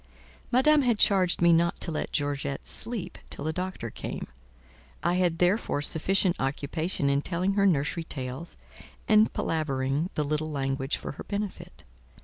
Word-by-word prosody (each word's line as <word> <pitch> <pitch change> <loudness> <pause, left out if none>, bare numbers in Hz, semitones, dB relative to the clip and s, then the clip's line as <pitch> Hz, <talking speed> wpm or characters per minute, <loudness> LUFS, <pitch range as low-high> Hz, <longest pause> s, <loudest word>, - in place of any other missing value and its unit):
Madame 290 +4 +5
had 240 -4 +2
charged 185 -4 +4
me 170 0 +6
not 170 +1 +2
to - - -3
let 155 - -3
Georgette 145 -2 -2
sleep 210 -7 -4
till 140 - -6
the 160 - -1
doctor 180 - -4
came; - - -5 0.8
I 175 - +2
had 180 -2 +1
therefore 180 -4 +1
sufficient 185 +4 +3
occupation 145 +3 -1
in 140 0 +2
telling 185 +4 0
her 200 0 +3
nursery 150 0 0
tales 130 +3 -6 0.5
and 215 0 +5
palavering 145 0 -1
the 150 - +1
little 150 +2 -1
language 135 -1 -1
for - - -6
her - - -8
benefit. 205 -1 -5
165 Hz, 150 wpm, -27 LUFS, 145-185 Hz, 0.8 s, me